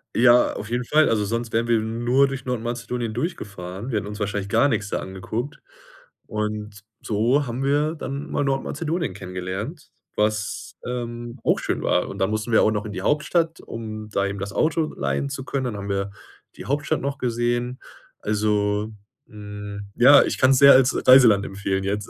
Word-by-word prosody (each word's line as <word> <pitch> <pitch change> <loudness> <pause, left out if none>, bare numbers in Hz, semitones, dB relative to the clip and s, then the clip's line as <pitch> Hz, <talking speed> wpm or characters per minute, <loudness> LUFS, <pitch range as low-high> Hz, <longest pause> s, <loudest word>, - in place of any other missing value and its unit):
Ja, 120 +1 +5
auf 105 - -6
jeden 120 +1 -1
Fall. 155 +5 +3
Also, 110 -2 +1
sonst 115 +2 -3
wären 115 +1 +1
wir 115 -1 +4
nur 120 +5 +2
durch 135 -1 -5
Nordmazedonien 120 -1 -3
durchgefahren. 100 - -5
Wir 110 - 0
hätten 105 - -3
uns 105 +1 -7
wahrscheinlich 105 -1 -2
gar 115 +6 +4
nix 110 -6 -1
da - - -1
angeguckt 110 +9 -5 0.7
und 105 -1 -4 0.2
so 120 +7 +1
haben 125 +3 -3
wir 145 +3 +1
dann 140 -1 -5
mal 145 - 0
Nordmazedonien 150 - -2
kennengelernt, 95 - -6 0.2
was, 105 -1 -2
ähm, 120 0 -5
auch - - +2
schön - - -2
war - - +1
und 100 - -7
dann 95 +1 +1
mussten 110 +2 -2
wir 110 - +6
auch - - +4
noch 105 -1 -2
in 105 - -6
die 95 - -5
Hauptstadt, 165 - +1
um 110 -2 -7
da 100 -1 0
eben 100 0 -4
das 100 +1 -5
Auto 155 +4 0
leihen 140 - -2
zu 135 -1 -5
können. 135 0 -2
Dann 120 -4 -3
haben 100 0 -6
wir 100 0 -2 0.4
die - - -9
Hauptstadt 145 +3 0
noch 140 0 -3
gesehen. 120 +1 -1 0.4
Also, 105 0 0 0.3
hm, 105 -2 -8
ja, 140 +4 +8
ich - - -1
kann's 130 0 +5
sehr 140 +1 +9
als 130 0 +4
Reiseland 120 -6 +7
empfehlen 95 -1 -2
jetzt. 100 +1 -2
115 Hz, 180 wpm, -23 LUFS, 105-130 Hz, 0.7 s, sehr